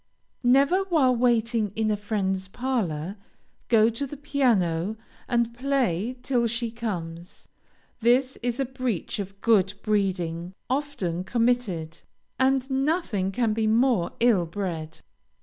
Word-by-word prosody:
Never, 275 +9 +4
while 295 -9 +3
waiting 230 -3 +1
in 220 -1 +1
a - - +2
friend's 195 -3 -2
parlor, 195 - -2 0.5
go 220 -2 +5
to 275 +5 -3
the 295 - -8
piano 220 - +1 0.3
and 235 -2 +1
play 250 -4 0
till 240 -3 +1
she 235 0 -2
comes. 175 -7 -6 0.5
This 255 +3 +3
is 245 +1 -2
a 270 - +1
breach 255 -7 -3
of 195 0 -6
good 200 -4 +3
breeding 185 -4 -1 0.2
often 230 - -2
committed, 220 -9 0 0.4
and 265 0 +2
nothing 265 - 0
can 230 0 +1
be 220 0 0
more 225 -4 +2
ill 220 -8 +3
bred. 165 -3 -5
225 Hz, 125 wpm, -26 LUFS, 190-255 Hz, 0.5 s, go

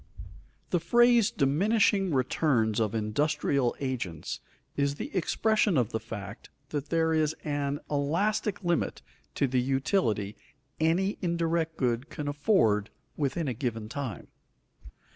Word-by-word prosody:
_The 175 - +2
phrase 240 +4 +5
"diminishing 195 +6 +2
returns 125 -5 +1
of 110 -1 0
industrial 135 +3 +1
agents" 120 - -3 0.4
is 140 0 +1
the - - -6
expression 210 +1 +2
of 120 -2 +1
the 110 - -1
fact 110 -1 -8 0.2
that 145 -1 -4
there 160 -1 +2
is 155 0 +1
an 145 -1 -1
elastic 195 +9 0
limit 175 -1 0 0.3
to - - +2
the 130 -1 +1
utility 125 - 0 0.4
any 175 +5 +1
indirect 170 -2 0
good 125 +1 0
can 150 - -5
afford 145 - +2 0.3
within 145 +2 -1
a 130 - 0
given 115 -3 -3
time. 130 -6 -5
145 Hz, 125 wpm, -28 LUFS, 120-170 Hz, 0.4 s, phrase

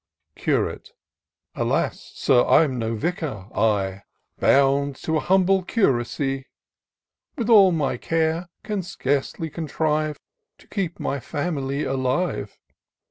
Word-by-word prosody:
Curate. - - -1 0.3
" - - -55
Alas! - - -1
Sir, 125 -2 +4
I'm 135 -6 +4
no 115 0 -1
vicar; 140 - -3
— - - -20 0.2
I, 95 -1 -4 0.4
Bound 140 0 +3
to 160 0 +1
an - - 0
humble 190 +1 +3
curacy. 135 - 0 0.9
With 235 -1 0
all 200 -4 +8
my 145 -7 0
care 165 +4 -1
can 210 -3 -2
scarce 145 -6 -1
contrive 155 -1 -2 0.4
To - - -21
keep 185 -5 -3
my 140 - -2
family 140 0 -2
alive. 130 - -1
150 Hz, 120 wpm, -23 LUFS, 135-175 Hz, 0.9 s, all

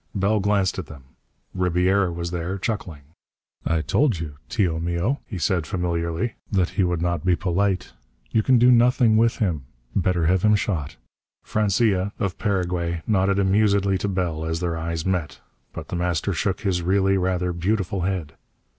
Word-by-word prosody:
Bell 100 +2 +2
glanced 100 -1 +1
at 85 - -6
them. 70 -4 -12 0.5
Ribiera 90 +1 +2
was 85 0 -4
there, 90 +2 -3
chuckling. 95 -8 -4 0.6
"I 80 -1 +1
told 120 - +1
you, 75 -3 -6
tio 90 -8 0
mio," 85 - -1
he 100 - -6
said 85 -2 0
familiarly, 85 +4 -2 0.2
"that 95 -3 +2
he 95 - 0
would 90 -2 0
not 85 -3 -1
be 90 -1 +3
polite. 95 -2 -1 0.4
You 110 - +3
can 130 +3 +4
do 125 +2 +6
nothing 120 -1 +4
with 115 +1 +3
him. 85 - -1 0.3
Better 90 -2 +1
have 90 +2 +3
him 105 +1 +4
shot." 85 -8 -2 0.5
Francia, 100 -1 +1
of 100 -4 -3
Paraguay, 90 -4 -1
nodded 100 -2 +2
amusedly 100 -1 +2
to - - -2
Bell 90 -5 -2
as 80 0 -2
their 85 -2 -2
eyes 80 0 -3
met. 90 -5 -2 0.3
But 80 - -8
The - - -3
Master 90 +2 -1
shook 95 +3 -1
his 95 -3 0
really 95 +2 +2
rather 90 -1 0
beautiful 95 +1 -1
head. 90 -4 -2
90 Hz, 165 wpm, -23 LUFS, 85-100 Hz, 0.6 s, do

